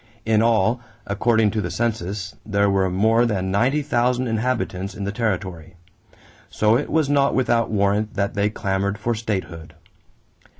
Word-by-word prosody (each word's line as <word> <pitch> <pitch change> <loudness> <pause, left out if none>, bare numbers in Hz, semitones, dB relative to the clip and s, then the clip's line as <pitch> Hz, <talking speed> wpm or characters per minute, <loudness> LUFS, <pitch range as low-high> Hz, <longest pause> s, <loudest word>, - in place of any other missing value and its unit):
In 110 -1 +3
all, 115 +1 +2 0.2
according 110 +1 +2
to 110 - -1
the - - -3
census, 105 -4 -3
there 100 -1 +1
were 95 -1 +2
more 110 +6 +3
than 95 -4 -1
ninety 130 +9 +1
thousand 125 -2 +1
inhabitants 110 -5 -2
in 100 - -5
the 100 - -2
territory; 95 -6 -3 0.7
so 105 +1 +2
it 140 - -1
was 155 -2 +2
not 140 -1 +2
without 120 -3 +1
warrant 105 +1 0
that 100 -1 -1
they 105 0 +1
clamored 100 -1 -2
for 115 +3 -1
statehood. 95 -7 -5
105 Hz, 155 wpm, -22 LUFS, 100-120 Hz, 0.7 s, In